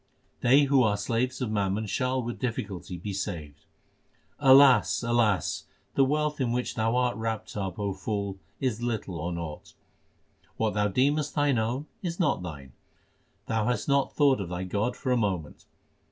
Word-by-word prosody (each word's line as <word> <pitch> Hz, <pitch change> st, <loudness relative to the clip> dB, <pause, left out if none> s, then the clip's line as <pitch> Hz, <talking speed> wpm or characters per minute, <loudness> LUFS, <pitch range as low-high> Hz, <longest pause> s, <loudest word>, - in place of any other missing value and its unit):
They 135 Hz, +4 st, +5 dB
who 140 Hz, -1 st, +4 dB
are 105 Hz, -4 st, +2 dB
slaves 120 Hz, +6 st, -1 dB
of 120 Hz, -4 st, -1 dB
mammon 100 Hz, 0 st, 0 dB
shall 130 Hz, +4 st, -1 dB
with 120 Hz, +1 st, -5 dB
difficulty 100 Hz, -7 st, -4 dB
be 100 Hz, +4 st, -5 dB
saved: 80 Hz, -6 st, -5 dB, 0.7 s
Alas! 135 Hz, -4 st, +6 dB
alas! 115 Hz, -7 st, +1 dB, 0.3 s
the 135 Hz, -, +4 dB
wealth 150 Hz, +1 st, 0 dB
in 120 Hz, -3 st, +1 dB
which 125 Hz, +1 st, -1 dB
thou 115 Hz, +1 st, 0 dB
art 125 Hz, -2 st, +1 dB
wrapped 110 Hz, -1 st, -4 dB
up, 95 Hz, -4 st, -3 dB
O 100 Hz, -1 st, -2 dB
fool, 100 Hz, 0 st, -3 dB, 0.2 s
is 120 Hz, -4 st, -1 dB
little 110 Hz, -8 st, -3 dB
or 85 Hz, +3 st, -3 dB
naught. 85 Hz, -3 st, -7 dB, 0.8 s
What 110 Hz, -1 st, 0 dB
thou 105 Hz, 0 st, +2 dB
deemest 140 Hz, +8 st, +1 dB
thine 145 Hz, -5 st, +2 dB
own 120 Hz, +6 st, -2 dB, 0.2 s
is 175 Hz, -1 st, -4 dB
not 175 Hz, -, +1 dB
thine. 70 Hz, -7 st, -8 dB, 0.7 s
Thou 110 Hz, -1 st, 0 dB
hast 125 Hz, -, -1 dB
not 140 Hz, -1 st, +1 dB
thought 140 Hz, -6 st, +4 dB
of 90 Hz, -, -5 dB
thy 90 Hz, +1 st, -3 dB
God 105 Hz, +6 st, -1 dB
for 130 Hz, -, -2 dB
a 125 Hz, -, +3 dB
moment. 95 Hz, -9 st, -2 dB
115 Hz, 170 wpm, -27 LUFS, 100-130 Hz, 0.8 s, Alas